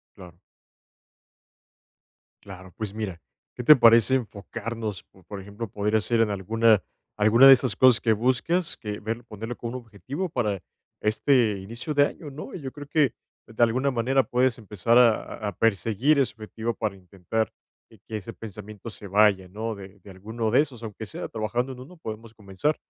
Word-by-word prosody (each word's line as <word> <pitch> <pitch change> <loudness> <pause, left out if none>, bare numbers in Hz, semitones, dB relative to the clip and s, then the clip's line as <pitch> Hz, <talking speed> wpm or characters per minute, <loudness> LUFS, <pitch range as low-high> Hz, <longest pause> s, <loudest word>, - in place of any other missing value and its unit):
Claro. 85 -2 -13 2.1
Claro, 95 -2 -12
pues, 110 -3 -4
mira, 100 -6 -5 0.3
¿qué 125 - -6
te 150 +5 +8
parece 115 +1 +6
enfocarnos, 110 -3 -5
por 95 - -23
por 100 -1 -7
ejemplo, 105 +3 -7
poder 105 +2 -1
hacer 110 +2 +2
en 110 -2 +3
alguna 110 +1 +2 0.3
alguna 110 +5 +6
de 135 - +11
esas 130 -3 -1
cosas 130 -3 +6
que 115 - +2
buscas? 130 - 0
Que 105 -3 -6
ver 115 +3 -4
ponerlo 115 +1 -7
como 120 +1 -5
un 125 - -8
objetivo 130 - -5
para 105 - -1 0.4
este 110 0 +2
inicio 115 - -6
de 145 0 +5
año, 150 0 -8
¿no? 145 - -8
Y, 185 - -7
yo 135 -2 -6
creo 145 -1 -10
que 145 -6 +2 0.3
de 115 +1 -3
alguna 130 +4 +2
manera 130 +2 +2
puedes 125 -1 +1
empezar 110 +2 +1
a 115 -3 +3
a 105 - -4
perseguir 115 +7 +2
ese 135 - +2
objetivo 110 +1 -5
para 110 -3 -3
intentar 95 +4 -3 0.4
que - - -20
que 110 - -4
ese 105 +2 -7
pensamiento 105 0 -9
se 105 - -10
vaya, 100 -1 +3
¿no?, 110 +4 -5
de 100 0 -12
de 100 - -14
alguno 110 +4 -4
de 125 +6 +5
esos, 130 -6 -9
aunque 110 0 -7
sea 95 - -6
trabajando 120 +4 -2
en - - -14
uno, 150 +8 -12
podemos 115 -5 -8
comenzar. 105 +8 -2
110 Hz, 180 wpm, -25 LUFS, 105-125 Hz, 2.1 s, de